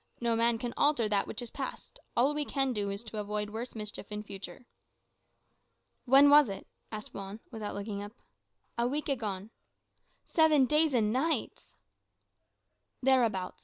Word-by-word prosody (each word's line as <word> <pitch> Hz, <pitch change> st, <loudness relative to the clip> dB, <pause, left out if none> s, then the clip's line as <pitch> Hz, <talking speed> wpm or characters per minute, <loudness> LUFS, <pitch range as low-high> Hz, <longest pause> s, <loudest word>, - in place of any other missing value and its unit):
No 235 Hz, -1 st, +1 dB
man 230 Hz, 0 st, +3 dB
can 240 Hz, +1 st, -4 dB
alter 285 Hz, -7 st, +3 dB
that 205 Hz, -1 st, +1 dB
which 245 Hz, -, -4 dB
is 235 Hz, -, -8 dB
past. 270 Hz, -1 st, -7 dB, 0.2 s
All 265 Hz, +5 st, +4 dB
we 295 Hz, 0 st, -1 dB
can 270 Hz, -2 st, 0 dB
do 205 Hz, -2 st, -1 dB
is 200 Hz, +3 st, -5 dB
to 220 Hz, -2 st, -6 dB
avoid 210 Hz, 0 st, -2 dB
worse 235 Hz, +3 st, -6 dB
mischief 210 Hz, -1 st, -6 dB
in 210 Hz, 0 st, -4 dB
future." 195 Hz, +1 st, -9 dB, 1.4 s
"When 270 Hz, +3 st, +7 dB
was 290 Hz, -4 st, +7 dB
it?" 195 Hz, -1 st, -6 dB, 0.3 s
asked 215 Hz, -1 st, -7 dB
Juan, 195 Hz, +2 st, -7 dB
without 220 Hz, -3 st, -5 dB
looking 200 Hz, 0 st, -4 dB
up. 205 Hz, +1 st, -8 dB, 0.7 s
"A 235 Hz, -, +2 dB
week 290 Hz, +4 st, -2 dB
agone." 215 Hz, -6 st, -3 dB, 0.7 s
"Seven 310 Hz, -4 st, +4 dB
days 300 Hz, 0 st, +3 dB
and 215 Hz, -2 st, +2 dB
nights!" 260 Hz, -, -2 dB, 1.3 s
"Thereabouts. 230 Hz, -8 st, +2 dB
230 Hz, 155 wpm, -31 LUFS, 210-265 Hz, 1.4 s, When